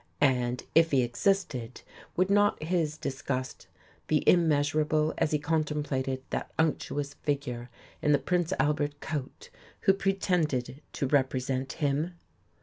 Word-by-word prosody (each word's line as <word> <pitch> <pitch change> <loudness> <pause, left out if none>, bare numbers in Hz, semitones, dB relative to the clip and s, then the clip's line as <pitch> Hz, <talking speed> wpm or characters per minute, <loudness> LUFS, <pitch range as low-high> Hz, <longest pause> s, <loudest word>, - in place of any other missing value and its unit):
And, 125 -3 +2
if 165 0 +5
He 135 -4 +3
existed, 125 - -1 0.3
would 185 +2 +2
not 205 -4 +3
His 160 -2 0
disgust 130 -2 -4 0.4
be 155 -1 +1
immeasurable 155 -1 +3
as 165 - +2
He 150 - +2
contemplated 145 -4 -1
that - - -2
unctuous 145 -2 0
figure 130 -5 -3 0.3
in 150 - +2
the 145 - +6
"Prince 175 +2 0
Albert" 145 -1 0
coat, 155 - -6 0.3
who 195 - +5
pretended 175 -9 0
to - - -1
represent 130 -1 0
Him? 155 +3 -1
150 Hz, 125 wpm, -29 LUFS, 130-165 Hz, 0.4 s, the